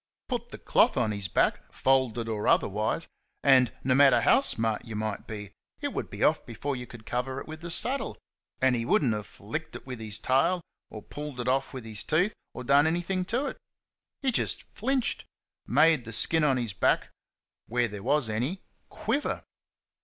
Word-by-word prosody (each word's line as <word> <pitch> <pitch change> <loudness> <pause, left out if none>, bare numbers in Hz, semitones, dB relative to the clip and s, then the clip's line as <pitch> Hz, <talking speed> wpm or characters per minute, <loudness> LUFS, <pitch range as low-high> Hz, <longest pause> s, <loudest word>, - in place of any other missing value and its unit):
Put 240 -2 -3
the - - -8
cloth 240 - +3
on 115 -4 +2
his 100 -2 -3
back - - +1
folded 130 -4 +2
or 110 -2 -2
otherwise 105 +10 +1 0.4
and, 130 -4 +6
no 130 - +3
matter 135 -3 +6
how 260 - +5
smart 115 - -1
you 115 -2 -7
might 110 -1 -3
be, 105 -2 -6 0.3
it - - -3
would - - -3
be - - -4
off - - +3
before 135 +5 -4
you 125 -1 -6
could 115 -2 -12
cover 125 +2 -2
it - - -9
with 155 0 -8
the 170 - -6
saddle, 255 +11 -1 0.4
and 130 -1 +4
he 115 - -1
would 120 - +3
n't 120 -5 +2
have 105 -2 -4
flicked - - -6
it - - -9
with 125 -3 -6
his 110 -1 -2
tail, 135 +11 +2 0.3
or 110 - -9
pulled 150 -3 -7
it 120 - -3
off 135 +1 +1
with 130 -4 -7
his 110 -1 -3
teeth, 180 +7 +2 0.2
or 125 - -5
done 140 +4 +5
anything 175 +3 0
to 245 +9 -1
it. - - -5 0.6
He 265 - +3
just - - -1
flinched 260 +2 -1 0.4
made 150 +3 +4
the 115 0 -7
skin 160 +8 +3
on 135 -3 +3
his 115 -5 -2
back 95 - +1 0.6
where 120 +1 +1
there 105 -2 -7
was 140 +2 +2
any 125 - -2 0.3
QUIVER. 285 - -2
130 Hz, 195 wpm, -28 LUFS, 110-160 Hz, 0.6 s, and